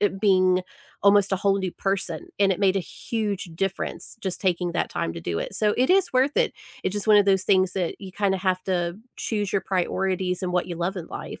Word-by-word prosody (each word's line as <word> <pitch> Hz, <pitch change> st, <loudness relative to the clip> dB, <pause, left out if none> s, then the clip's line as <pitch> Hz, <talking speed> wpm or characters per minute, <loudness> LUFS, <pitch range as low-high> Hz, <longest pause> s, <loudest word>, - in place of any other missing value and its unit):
eh, 205 Hz, -, +4 dB
being 185 Hz, -3 st, +4 dB, 0.4 s
almost 200 Hz, 0 st, +5 dB
a 195 Hz, -, +3 dB
whole 195 Hz, +1 st, +2 dB
new 190 Hz, -2 st, -2 dB
person, 195 Hz, -, -2 dB
and 195 Hz, -1 st, +4 dB
it 185 Hz, -, -4 dB
made 195 Hz, -1 st, +3 dB
a -, -, +3 dB
huge 210 Hz, 0 st, -3 dB
difference 195 Hz, +3 st, -3 dB
just 190 Hz, -4 st, -3 dB
taking 180 Hz, -2 st, 0 dB
that -, -, -1 dB
time 80 Hz, -, -2 dB
to -, -, -6 dB
do 85 Hz, 0 st, -2 dB
it, -, -, -4 dB
so 210 Hz, -1 st, +2 dB
it 255 Hz, -, +3 dB
is 385 Hz, -3 st, +3 dB
worth 265 Hz, +3 st, +2 dB
it, -, -, +2 dB, 0.3 s
it's -, -, 0 dB
just 205 Hz, +1 st, -3 dB
one 210 Hz, -, +8 dB
of 205 Hz, -, +6 dB
those 190 Hz, -1 st, +3 dB
things 185 Hz, -2 st, +3 dB
that 180 Hz, -3 st, -2 dB
you 190 Hz, -2 st, -9 dB
kinda 195 Hz, -1 st, +1 dB
have 185 Hz, -1 st, 0 dB
to 175 Hz, -1 st, -1 dB, 0.2 s
choose 205 Hz, -3 st, -2 dB
your 195 Hz, -1 st, +1 dB
priorities 185 Hz, 0 st, -1 dB
and 180 Hz, -1 st, -2 dB
what 180 Hz, 0 st, +1 dB
you 175 Hz, -2 st, -5 dB
love 175 Hz, +4 st, -2 dB
in 170 Hz, -, -7 dB
life. -, -, -7 dB
190 Hz, 235 wpm, -25 LUFS, 180-205 Hz, 0.4 s, one